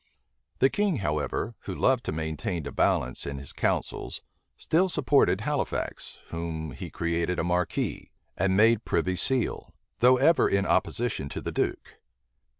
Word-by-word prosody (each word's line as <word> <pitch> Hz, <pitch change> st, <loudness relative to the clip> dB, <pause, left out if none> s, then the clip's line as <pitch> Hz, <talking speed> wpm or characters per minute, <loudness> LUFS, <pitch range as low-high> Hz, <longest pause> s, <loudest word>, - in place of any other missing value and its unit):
The 135 Hz, -, +4 dB
king, 205 Hz, -4 st, +1 dB
however, 75 Hz, -, -2 dB
who -, -, -4 dB
loved 130 Hz, -2 st, +2 dB
to -, -, -1 dB
maintain 80 Hz, +1 st, -3 dB
a 70 Hz, -, -5 dB
balance 65 Hz, +2 st, 0 dB
in 70 Hz, 0 st, -4 dB
his 70 Hz, 0 st, -7 dB
councils, -, -, -2 dB, 0.3 s
still 185 Hz, +4 st, +2 dB
supported 105 Hz, -, +3 dB
Halifax, 145 Hz, +4 st, -3 dB
whom 80 Hz, -2 st, -4 dB
he 65 Hz, -, -7 dB
created 85 Hz, +1 st, -1 dB
a -, -, 0 dB
marquis, 90 Hz, 0 st, -1 dB, 0.3 s
and 95 Hz, +1 st, +1 dB
made 115 Hz, +1 st, +5 dB
privy 90 Hz, +2 st, 0 dB
seal; 130 Hz, +6 st, -1 dB, 0.2 s
though 125 Hz, +1 st, +6 dB
ever 150 Hz, +6 st, +4 dB
in 100 Hz, 0 st, +1 dB
opposition 115 Hz, -13 st, 0 dB
to -, -, -5 dB
the -, -, -4 dB
duke. -, -, -3 dB
95 Hz, 150 wpm, -27 LUFS, 80-125 Hz, 0.3 s, though